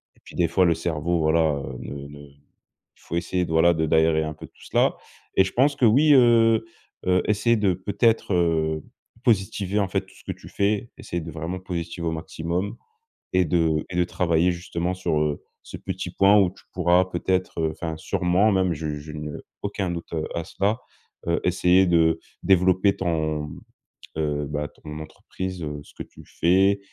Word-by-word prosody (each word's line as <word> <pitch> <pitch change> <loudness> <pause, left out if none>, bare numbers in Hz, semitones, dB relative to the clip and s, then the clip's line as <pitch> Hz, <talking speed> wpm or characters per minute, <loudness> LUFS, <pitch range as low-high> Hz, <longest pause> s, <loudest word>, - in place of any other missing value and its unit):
et - - -27
puis - - -13
des 85 -1 +2
fois 90 +3 +3
le 85 - +4
cerveau, 85 +1 -1
voilà, 80 0 +3
heu, 65 -1 -7
ne 70 0 -7
ne 75 - -11 0.8
il - - -29
faut - - -5
essayer 90 +1 -1
de, - - -7
voilà, 80 +2 +5
de 80 0 +1
d'aérer 80 0 +3
un 75 0 -4
peu 75 - -11
tout - - -21
cela - - +2 0.4
et 95 - +6
je 95 - -4
pense 140 +3 +3
que, 140 - -4
oui, 145 +7 +6
heu 115 -3 +5 0.4
heu, 90 0 +3
essayer 110 +3 +3
de 100 -3 +2
peut-être, 100 +3 +1
heu, 80 -3 +1 0.4
positiver, 100 -3 +1
en 100 - +1
fait, 95 +1 0
tout 95 0 -20
ce - - -18
que - - -4
tu - - -13
fais, 105 +3 0
essayer 85 -1 -4
de 80 - -7
vraiment 80 +4 -4
positiver 85 -2 -4
au - - 0
maximum 85 +4 -3 0.6
et 90 0 +3
de 80 -2 +1
et 90 - -5
de 90 - +3
travailler 90 0 +1
justement 85 0 -3
sur, 90 -4 -1
heu, 75 -1 -1 0.2
ce - - -9
petit 95 -2 -5
point 100 +3 +5
où 95 -3 +4
tu 95 - -19
pourras 90 +1 +3
peut-être, 90 -1 -1
enfin, 80 0 -5
sûrement 90 +6 +1
même, 95 -2 +2
je 75 -1 -4
je 75 +1 -9
n'ai 75 0 -5 0.3
aucun 100 -2 -2
doute 85 -1 -6 0.2
à 85 - -2
cela, 100 +7 -1 0.5
heu, 85 0 +1
essayer 90 +1 +4
de 80 -1 +3 0.2
développer 95 +1 +3
ton, 80 -4 -1 0.7
heu, 75 -2 -1
bah 75 0 -3
ton 75 0 -10
entreprise, 95 +3 -7
heu, 75 -1 -4
ce - - -19
que - - -7
tu - - -16
fais, 95 +4 +3
90 Hz, 190 wpm, -24 LUFS, 80-95 Hz, 0.8 s, et